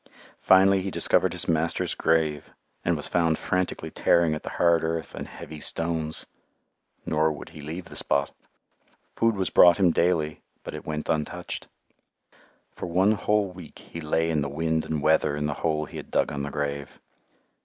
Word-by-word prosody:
Finally 95 +1 +5
he 95 - -3
discovered - - +3
his - - -2
master's 80 0 0
grave 80 -2 +1 0.3
and 85 -2 +1
was 75 - -6
found 80 -2 +2
frantically 90 0 -2
tearing 85 -2 +3
at 75 - -4
the - - -6
hard 85 -1 +2
earth 80 0 -2
and - - -6
heavy 75 0 -9
stones. 80 0 -2 0.8
Nor 80 0 +2
would 75 - -8
he 75 - -11
leave 80 +5 -6
the - - -12
spot. 70 0 0 0.8
Food 115 -1 +2
was 95 -1 -1
brought 85 -1 +7
him 95 -4 +4
daily, 80 -3 +1 0.2
but - - -7
it - - -8
went 75 0 -3
untouched. 75 -2 -3 1.0
For - - -6
one 95 +4 +3
whole 105 -2 +1
week 90 -4 -12
he 85 - -9
lay 80 +1 0
in 75 -2 +1
the 70 - -2
wind 80 +2 -1
and 75 -2 -3
weather 75 -2 +3
in 75 - -1
the 75 - -1
hole 75 -1 0
he - - -10
had - - -8
dug - - +1
on 70 - -3
the 70 - -3
grave. 70 -1 -4
80 Hz, 180 wpm, -26 LUFS, 75-85 Hz, 1.0 s, brought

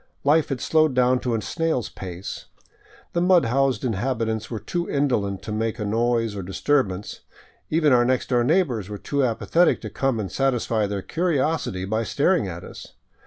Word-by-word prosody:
Life 150 +2 +3
had 135 -3 -2
slowed 155 -2 +2
down 125 0 +3
to 125 -2 -1
a 110 - -1
snail's 160 - -1
pace. 90 0 -7 0.7
The 170 - +1
mud 180 -5 +4
housed 130 -1 +1
inhabitants 110 -1 -1
were 115 - -4
too 175 +10 -3
indolent 110 -9 0
to - - -6
make 110 +1 -1
a 105 - -3
noise 115 0 0
or 100 - -4
disturbance; 100 +1 -1 0.5
even 155 -3 +3
our 120 -1 +5
next 130 +1 0
door 120 -2 +3
neighbors 125 - +1
were 105 - -5
too 140 +6 -1
apathetic 130 +8 +2
to - - -7
come 135 -4 0
and 95 -4 -4
satisfy 120 -5 0
their 100 -1 -4
curiosity 160 - -1
by 110 +3 -1
staring 145 - +1
at 85 -1 -7
us. - - -11
120 Hz, 175 wpm, -23 LUFS, 105-145 Hz, 0.7 s, our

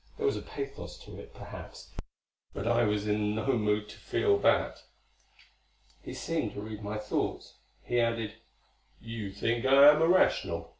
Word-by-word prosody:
There 445 - -2
was 420 - +2
a - - -4
pathos 140 0 -7
to - - -10
it, - - -11
perhaps, - - -11 0.6
but 100 - -4
I 120 0 +3
was 105 0 0
in 105 0 0
no 110 +5 0
mood 105 -1 0
to - - -11
feel 410 -1 +1
that. - - +2 1.2
He - - -8
seemed 160 -10 -2
to 100 - -6
read 110 0 -7
my 105 +1 -4
thoughts. 105 0 -3 0.2
He 120 - 0
added, 115 -2 0 0.7
"You 115 -3 -6
think 115 +4 -1
I 135 +2 +8
am 150 +1 +1
irrational. 175 +3 +2
115 Hz, 160 wpm, -30 LUFS, 105-140 Hz, 1.2 s, I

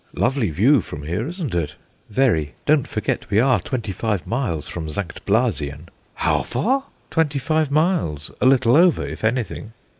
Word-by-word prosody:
Lovely 120 -4 +1
view 110 - +4
from 75 -4 -8
here, 90 - -2
isn't 170 - -4
it?" 80 -3 -1 0.3
"Very. 100 - +1
Don't 150 -3 +3
forget 110 -1 -2
we 105 - +3
are 125 -2 +4
twenty 110 +2 -3
five 105 -1 -2
miles 110 - -2
from 80 -3 -5
St. 85 +3 -5
Blasien." 85 - 0 0.3
"How - - +1
far?" 270 +4 0 0.3
"Twenty 155 -3 +1
five 155 +2 +1
miles, 145 - 0
a - - +5
little 130 -2 +5
over 175 +1 +4
if - - -7
anything." 110 -1 -2
115 Hz, 160 wpm, -22 LUFS, 85-140 Hz, 0.3 s, a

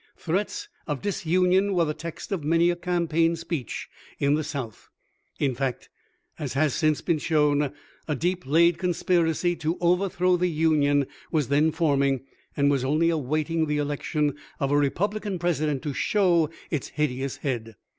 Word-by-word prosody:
Threats 190 +4 -2 0.2
of 150 -4 -2
disunion 185 +1 +2
were 170 -2 +3
the 150 - -1
texts 170 +4 -8
of 185 -6 -2
many 165 +3 +3
a - - -2
campaign 170 -2 +1
speech 165 - -4 0.3
in 140 0 +2
the 155 +1 +1
South: 135 -8 -6 0.5
in 135 -3 +1
fact, 130 0 -3 0.5
as 145 -5 -3
has 145 0 +2
since 155 -2 +1
been 165 -3 0
shown, 150 -2 +2 0.4
a 150 - 0
deep 175 +1 -2
laid 170 +3 +4
conspiracy 175 -1 +1
to 160 +2 -1
overthrow 180 0 +2
the 180 +1 +1
Union 150 -3 +2 0.3
was 150 -6 0
then 150 +3 +3
forming, 140 -5 +1 0.4
and 140 0 +3
was 135 -3 +1
only 155 +5 +2
awaiting 155 +2 0
the 150 0 0
election 145 0 -1 0.3
of 140 -1 0
a - - +3
Republican 200 +8 0
President 155 -5 0
to 145 - -3
show 175 -1 +2 0.2
its 150 -5 -2
hid 150 -2 0
eous 130 +1 -4
head. 115 -5 -3
155 Hz, 160 wpm, -26 LUFS, 145-175 Hz, 0.5 s, laid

